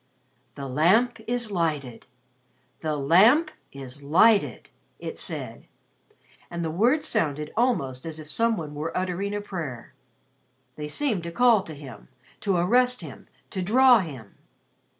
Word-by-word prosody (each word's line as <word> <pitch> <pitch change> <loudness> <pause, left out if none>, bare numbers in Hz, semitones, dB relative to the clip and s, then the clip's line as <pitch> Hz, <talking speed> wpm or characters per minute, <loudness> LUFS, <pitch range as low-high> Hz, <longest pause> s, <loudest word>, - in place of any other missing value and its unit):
"The 140 -1 -6
Lamp 190 - +2
is 240 -2 -1
lighted. 150 - -2 0.7
The 155 -2 -2
Lamp 215 - +5 0.2
is 135 0 -9
lighted," 195 +9 +3 0.3
it - - -7
said, - - -6 0.8
and 170 -1 -4
the 160 - -2
words 250 - +2
sounded 150 - -1
almost 165 - 0
as 160 -1 -5
if 155 -1 -10
some 230 +7 +1
one 150 -3 -6
were 155 +3 -4
uttering 185 +2 -2
a 205 - -2
prayer. 160 - -7 0.8
They 150 0 -6
seemed 220 - -1
to 170 0 -6
call 235 +1 +4
to 160 -4 -9
him, 135 -7 -11 0.3
to 195 -3 0
arrest 250 +8 +2
him, - - -11 0.2
to 190 - -3
draw 245 +5 +5
him. 135 - -8
170 Hz, 140 wpm, -25 LUFS, 150-230 Hz, 0.8 s, Lamp